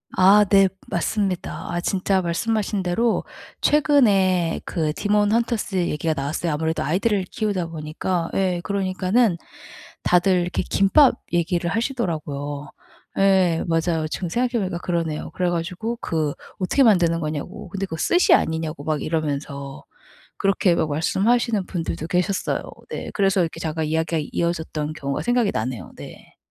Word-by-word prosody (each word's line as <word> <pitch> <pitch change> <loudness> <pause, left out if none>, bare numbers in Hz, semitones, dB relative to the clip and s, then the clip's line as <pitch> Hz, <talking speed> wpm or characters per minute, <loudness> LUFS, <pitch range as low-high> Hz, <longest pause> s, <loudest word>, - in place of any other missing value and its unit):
아 200 +3 +6
네. 195 -1 +5 0.2
맞습니다. 190 +1 -2
아 175 - -2
진짜 190 +1 +1
말씀하신 205 +4 -1
대로 190 +6 0 0.3
최근에 200 - +3
그 155 -3 -1
디몬 205 +3 +1
헌터스 230 -3 0
얘기가 165 -3 0
나왔어요. 150 +3 -2
아무래도 160 +2 -1
아이들을 195 - +1
키우다 200 -6 -2
보니까 165 +2 -3
예 185 -2 0
그러니까는 195 +1 +1 0.7
다들 180 +1 +3
이렇게 175 +1 -2
김밥 250 +9 +4 0.2
얘기를 175 0 0
하시더라고요. 150 - -3 0.5
예 190 -4 +4
맞아요. 165 -1 0
지금 175 +3 -4
생각해 245 +7 0
보니까 185 -2 -3
그러네요. 165 -4 -2
그래 180 -1 0
가지고 180 +7 -3
그 155 -3 -1 0.3
어떻게 195 +9 +2
만드는 175 -7 +4
거냐고. 165 +7 -5
근데 195 +2 -3
그 165 -4 -6
스시 350 - +3
아니냐고 160 -2 0
막 155 -2 -1
이러면서 140 -3 -3 0.5
그렇게 195 -2 +2
막 155 - 0
말씀하시는 205 +7 +1
분들도 165 -3 -4
계셨어요. 180 +3 0 0.3
네. - - -5
그래서 195 -2 +2
이렇게 165 -2 -2
잠깐 160 0 -2
이야기가 160 +1 0
이어졌던 160 -3 -2
경우가 140 -3 -3
생각이 245 -3 +2
나네요. 110 -4 -4
네. - - -12
175 Hz, 350 characters per minute, -22 LUFS, 160-200 Hz, 0.7 s, 아